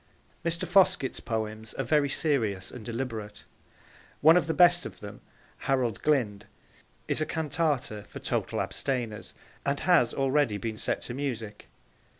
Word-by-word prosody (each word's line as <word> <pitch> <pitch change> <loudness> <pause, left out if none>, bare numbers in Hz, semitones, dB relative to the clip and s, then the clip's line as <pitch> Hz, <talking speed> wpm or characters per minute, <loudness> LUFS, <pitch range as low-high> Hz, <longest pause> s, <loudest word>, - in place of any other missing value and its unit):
Mr. 170 0 0
Foskett's 185 -8 +3
poems 110 -1 -4
are - - -1
very 150 -2 +2
serious 110 - 0
and 125 - -9
deliberate. 115 -3 -5 0.8
One 160 +3 +8
of 180 -2 +3
the 160 - +1
best 175 0 +6
of - - -8
them, 100 -1 -9 0.5
Harold 125 -6 +1
Glynde, 105 -9 +1 0.6
is - - 0
a - - +2
Cantata 150 -9 -1
for - - -10
Total - - -1
Abstainers, 120 -6 -3 0.3
and 140 0 -1
has 170 -9 +4
already 135 -5 +1
been 110 0 -4
set - - -1
to 120 - -6
music. 115 -6 -5
130 Hz, 145 wpm, -28 LUFS, 110-150 Hz, 0.8 s, One